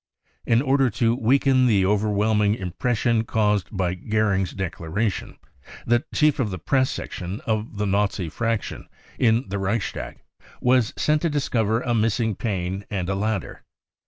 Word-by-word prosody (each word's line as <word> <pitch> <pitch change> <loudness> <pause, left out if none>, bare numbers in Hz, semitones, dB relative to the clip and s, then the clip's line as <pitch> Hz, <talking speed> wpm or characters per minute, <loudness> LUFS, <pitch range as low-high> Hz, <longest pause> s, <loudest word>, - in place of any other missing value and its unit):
In 115 +2 +3
order 135 -1 +3
to 115 +1 +1
weaken 130 +1 +3
the 100 -5 +3
overwhelming 105 +1 +2
impression 110 +4 0
caused 105 -3 +1
by 95 -3 -1
Goering's 100 -1 0
declaration, 95 +3 -3 0.5
the 120 +1 +2
chief 150 -2 +2
of 120 -5 +1
the 90 - -4
press 130 +9 +1
section 90 +3 -5
of 110 -1 -2
the 105 - 0
Nazi 100 -2 0
fraction 115 +7 -3 0.3
in 115 0 +3
the 100 +1 -2
Reichstag 100 +2 -3 0.4
was 125 -3 +3
sent 150 0 +2
to 170 - +1
discover 115 -6 0
a 120 -2 -1
missing 110 0 +1
pane 95 -2 -3
and 95 -3 -3
a - - +1
ladder. 105 -1 -2
110 Hz, 145 wpm, -23 LUFS, 100-120 Hz, 0.5 s, In